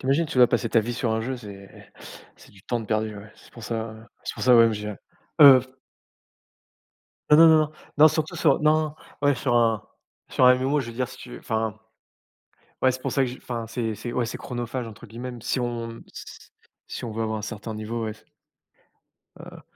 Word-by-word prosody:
...tu - - -13
imagines, 150 +5 +2
tu 150 -5 -3
vas 125 - +8
passer 120 -1 0
ta 115 - +4
vie 120 +3 -4
sur 115 -1 -1
un 110 - 0
jeu. 130 +3 -3
C'est 100 -4 -13 0.4
c'est - - -18
du 95 -2 -19
temps 120 +2 -2
de 110 - -8
perdu. 110 0 -1
Ouais, 105 +2 -11
c'est - - -19
pour 115 - -12
ça, 115 0 -4
heu, 110 0 -13 0.2
c'est - - -4
pour - - -7
ça, 125 - +5
moi 115 - +8
même 115 -1 +3
j'ai 105 0 -5 0.5
heu 135 -3 +10 1.7
Non 150 - +8
non 165 +1 +8
non 160 - +7
non 155 0 0 0.3
non, 155 +1 +9
surtout 155 0 -2
sur 145 -3 +3
non, 155 +1 +4
non, 155 -1 -3 0.3
ouais 145 -1 +3
sur 120 0 -1
un 115 -3 +2 0.5
sur 130 - +3
un 125 - +8
MMO, 135 +3 0
je 130 - -5
veux 115 - -7
dire, 125 +1 -2
si - - -12
tu - - -11
veux, - - -8
enfin. 110 -1 -2 1.0
Ouais, 130 - +4
c'est 130 - -7
pour - - -3
ça 135 - +2
que 130 - 0
j'y 125 - -7
enfin 115 -2 -5
c'est 115 -1 -3
c'est 120 +3 -6
ouais, 120 - 0
c'est 115 - -5
«chronophage,» 120 -1 -5
entre 115 +2 -12
guillemets 120 +3 -7
si 125 - -1
on 115 -1 -4 0.9
si - - -7
on 115 - -4
veut 115 +1 -3
avoir 110 0 -2
un - - -7
certain 110 +1 -6
niveau, 115 +2 -4
ouais. 110 - -4 1.2
Heu - - -12
120 Hz, 230 wpm, -24 LUFS, 110-130 Hz, 1.7 s, heu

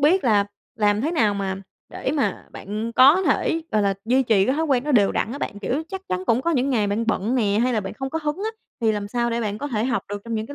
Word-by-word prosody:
biết 315 +4 +3
là 210 -4 +4 0.3
làm 210 -1 +2
thế 300 - 0
nào 220 -12 +2
mà 195 -1 -2 0.3
để - - -3
mà 285 - -1
bạn 215 +4 -5
có 280 +10 +6
thể, 330 -2 +1
gọi 210 -1 +3
là, 200 -1 +1
duy 255 +3 +3
trì 215 -5 +3
cái 260 - +2
thói 320 - +1
quen 265 -2 +1
nó 300 - -1
đều 205 -6 +4
đặn 230 - -1
á 285 - -5
bạn? 205 - -4
Kiểu, 250 +10 -2
chắc 385 -1 -5
chắn 185 0 -2
cũng 235 +2 +2
có 335 - +1
những 275 -2 +1
ngày 215 -5 +2
bạn 210 +3 -1
bận 225 +2 0
nè 210 -4 +2
hay 250 0 +1
là 220 - +1
bạn 190 - -6
không 265 +4 -5
có 320 - -2
hứng 295 +1 -1
á, 430 +3 -3 0.3
thì 225 -2 +2
làm 205 -1 -3
sao 235 +2 -1
để 235 0 -1
bạn 210 -2 -3
có 290 - -4
thể 220 -3 -1
học 260 -1 0
được 205 0 -5
trong 230 -1 -4
những 220 0 -2
cái 285 - -9
230 Hz, 295 wpm, -23 LUFS, 210-275 Hz, 0.3 s, có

